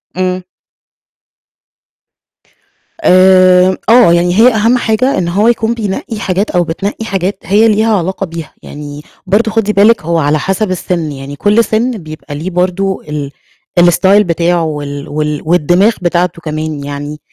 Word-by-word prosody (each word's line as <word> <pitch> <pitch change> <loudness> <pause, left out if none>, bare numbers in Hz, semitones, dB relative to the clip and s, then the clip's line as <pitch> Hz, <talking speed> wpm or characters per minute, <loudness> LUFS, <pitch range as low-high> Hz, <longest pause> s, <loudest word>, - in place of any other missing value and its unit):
امم. 185 0 -2 2.6
آمم، 185 0 +5
آه 230 -7 +6
يعني 175 +1 +1
هي 245 +1 +6
أهم 225 +3 +2
حاجة 240 +3 0
إن 175 - -1
هو 200 +6 +1
يكون 230 -1 +1
بينقّي 215 0 -4
حاجات 195 0 -1
أو 175 -1 +1
بتنقّي 200 +7 -4
حاجات 195 -2 -2
هي 210 +6 +3
ليها 215 0 +2
علاقة 190 +2 -3
بيها. 165 -2 -8
يعني 145 0 -9 0.3
برضو 220 +2 +1
خدي 215 -2 0
بالِك 210 +2 +4
هو 165 +1 -1
على 150 0 +1
حسب 195 +4 -2
السِن، 170 -3 -3
يعني 140 +1 -8
كل 210 +8 +2
سِن 230 +4 0
بيبقى 155 -7 -9
ليه 165 +6 -4
برضو 185 +2 -1
ال 150 -2 -6 0.5
الstyle 190 +4 +4
بتاعه 170 0 0
وال 145 -2 -5
وال 150 0 -2
والدماغ 175 +6 +3
بتاعته 175 -1 -1
كمان 155 -2 -4
يعني. 145 +1 -6
180 Hz, 145 wpm, -12 LUFS, 155-210 Hz, 2.6 s, آه